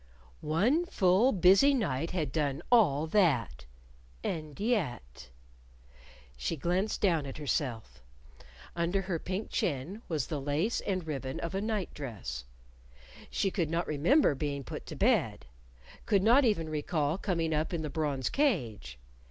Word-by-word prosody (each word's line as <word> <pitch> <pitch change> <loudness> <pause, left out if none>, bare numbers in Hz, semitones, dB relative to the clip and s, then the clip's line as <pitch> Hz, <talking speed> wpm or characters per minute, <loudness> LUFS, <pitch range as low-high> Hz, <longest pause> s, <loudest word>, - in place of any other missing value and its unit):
One 205 - +2
full 205 - +3
busy 195 +9 +5
night 165 - -1
had 160 -7 -2
done 145 0 -1
all 160 - +4
that! 130 - +1 0.6
And 155 -4 -4
yet 120 - -2 1.1
She - - -2
glanced 180 +7 -1
down 165 -8 +2
at 135 - -7
herself. 130 -6 -3 0.7
Under 175 +3 0
her 180 -3 -2
pink 190 +6 -4
chin 165 - -2
was 155 -7 -1
the 150 -3 -4
lace 150 - 0
and 185 -4 -2
ribbon 135 -4 -4
of 170 - -4
a 195 - -1
night 215 -3 -2
dress. 90 - -6 0.8
She 195 - 0
could 170 -6 -1
not 165 +2 0
remember 160 - +3
being 140 0 -3
put - - -8
to - - -7
bed - - +1 0.6
could 195 -2 +3
not 245 +6 +6
even 200 -8 +1
recall 155 +1 -1
coming 165 -5 -1
up 155 +1 0
in 170 -3 -2
the 150 - -3
bronze 145 -4 -1
cage. 120 - -1
160 Hz, 145 wpm, -30 LUFS, 140-195 Hz, 1.1 s, not